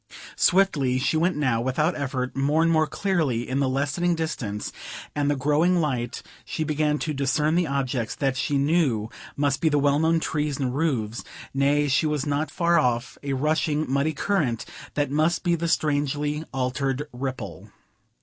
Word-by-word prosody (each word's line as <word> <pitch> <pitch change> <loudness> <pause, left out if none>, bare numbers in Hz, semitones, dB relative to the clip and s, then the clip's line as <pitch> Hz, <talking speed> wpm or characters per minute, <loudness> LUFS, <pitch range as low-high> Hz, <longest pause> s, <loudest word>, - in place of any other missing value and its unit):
Swiftly 150 -9 +3
she 130 +4 0
went 170 +3 +2
now 130 -6 +1
without 150 +7 0
effort; 130 -3 -3
more 145 +4 +2
and 165 - +3
more 155 -1 +3
clearly 150 - 0
in 130 +2 -1
the 135 -2 +2
lessening 145 +6 0
distance 125 -11 -3 0.4
and 145 -1 0
the 145 - +2
growing 150 +6 +2
light 130 -6 -2 0.2
she 160 - -3
began 150 -1 +1
to 155 +1 -3
discern 150 +3 +1
the 175 -1 +2
objects 130 -4 -1
that 135 -3 0
she 140 +2 0
knew 140 -7 +1 0.2
must 140 -1 0
be 160 - +3
the 145 - +2
well 145 0 +3
known 165 +1 +3
trees 150 -3 -1
and 130 -2 -2
roofs; 120 -8 -1 0.3
nay, 145 +2 +2
she 145 +3 +2
was 150 -3 -1
not 145 +1 -1
far 170 +1 +2
off 120 -3 -1
a 140 -1 -2
rushing, 150 +2 +1
muddy 140 +4 +1
current 150 - 0 0.3
that 145 -2 0
must 155 +4 +1
be 175 -2 +2
the 170 0 -1
strangely 150 -1 0
altered 135 +1 -1
Ripple. 115 - -5
145 Hz, 170 wpm, -25 LUFS, 130-155 Hz, 0.4 s, Swiftly